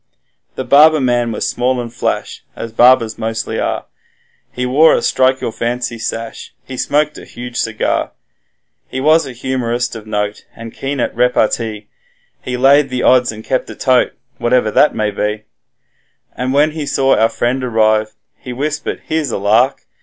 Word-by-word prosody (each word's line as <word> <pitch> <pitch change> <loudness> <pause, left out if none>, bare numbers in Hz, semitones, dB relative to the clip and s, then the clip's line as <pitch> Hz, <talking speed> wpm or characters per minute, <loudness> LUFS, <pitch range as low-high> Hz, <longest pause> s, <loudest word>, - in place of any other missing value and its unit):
The 130 - -3
barber 150 +5 +6
man 120 -3 +1
was - - -2
small 125 +1 0
and 120 -1 -6
flash, - - -3
as 115 - -6
barbers 120 -1 +4
mostly 115 0 -3
are, - - -2 0.7
He 125 - -3
wore 145 +6 +5
a - - 0
strike 130 0 +2
your - - -2
fancy 120 +1 -3
sash, 115 0 -6
he 130 - -8
smoked 150 +4 0
a - - -12
huge 120 0 -8
cigar: 110 -1 -1 0.8
He 130 - -5
was 155 +2 +3
a - - -6
humorist 120 -1 -2
of 110 -1 -9
note 105 0 -3
and 115 0 -9
keen 135 0 -4
at - - -1
repartee, 115 -3 0 0.5
He 125 -1 -4
laid 140 +2 +4
the 125 -1 -2
odds 125 -2 +4
and 110 0 -10
kept 130 +2 -2
a - - -8
'tote', 130 -2 +1 0.2
whatever 120 -2 +2
that 150 - +3
may 105 -1 0
be, 105 +1 -3 0.9
And 125 +1 -2
when 145 +3 +3
he 150 -2 -5
saw 135 0 +2
our 115 - +3
friend 125 +3 -1
arrive, 110 -2 +1 0.2
he 125 - -8
whispered 145 +4 -3
'Here's 155 -2 -1
a - - -2
lark! 110 +7 +2
125 Hz, 170 wpm, -16 LUFS, 115-130 Hz, 0.9 s, barber